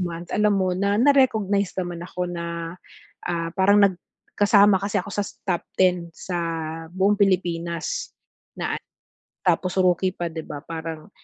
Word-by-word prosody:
month, 170 -1 -4
alam 210 -1 +3
mo, 185 -1 +1
na 200 +2 +1
na-recognize 220 -8 +3
naman 175 -2 -3
ako 180 0 -4
na, 170 0 -5 0.5
ah, 165 -1 -1
parang 195 +2 +5
nag 195 -2 +4 0.4
kasama 205 -1 +6
kasi 200 +1 -2
ako 205 +3 -9
sa - - 0 0.3
top 180 -3 0
10 180 -2 +2
sa 180 -2 -4 0.5
buong 190 +2 +3
Pilipinas 170 -4 0
na - - -57 1.4
a - - -2
tapos 185 -1 -4
rookie 180 +1 +3
pa, 175 -2 -3
'di 160 - -4
ba, 145 -1 -6
parang, 160 0 -6
185 Hz, 150 wpm, -24 LUFS, 170-200 Hz, 1.4 s, kasama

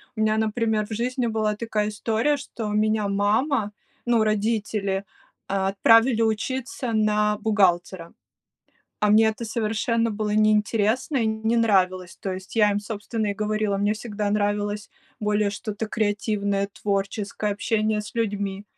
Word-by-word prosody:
У 215 - -2
меня, 215 0 +2
например, 220 -1 0
в 220 - -6
жизни 245 +2 -1
была 215 -1 0
такая 215 -1 -1
история, 225 +7 0
что 230 -6 -6
меня 215 0 +1
мама, 210 +3 +1 0.3
ну, 235 -2 +3
родители 210 -2 -1 0.4
отправили 220 +5 +3
учиться 235 +2 -2
на 210 -1 +2
бухгалтера, 190 -5 +1 0.9
а 210 - +2
мне 220 +1 +6
это 220 +2 -3
совершенно 230 +1 0
было 210 0 -2
неинтересно 215 +5 +2
и 230 - +1
не 220 +2 0
нравилось. 185 -5 +1
То 190 -1 -2
есть 185 +3 -9
я 210 -2 +4
им, 205 - 0
собственно, 215 +1 -4
и 200 - 0
говорила, 215 -1 -1
мне 205 +1 +1
всегда 210 -2 -3
нравилось 205 0 -1 0.3
более 210 -1 +1
что-то 210 +2 -4
креативное, 205 -2 -1
творческое, 200 +1 -2
общение 215 0 0
с 210 - -11
людьми. 200 -3 -2
215 Hz, 135 wpm, -24 LUFS, 205-225 Hz, 0.9 s, мне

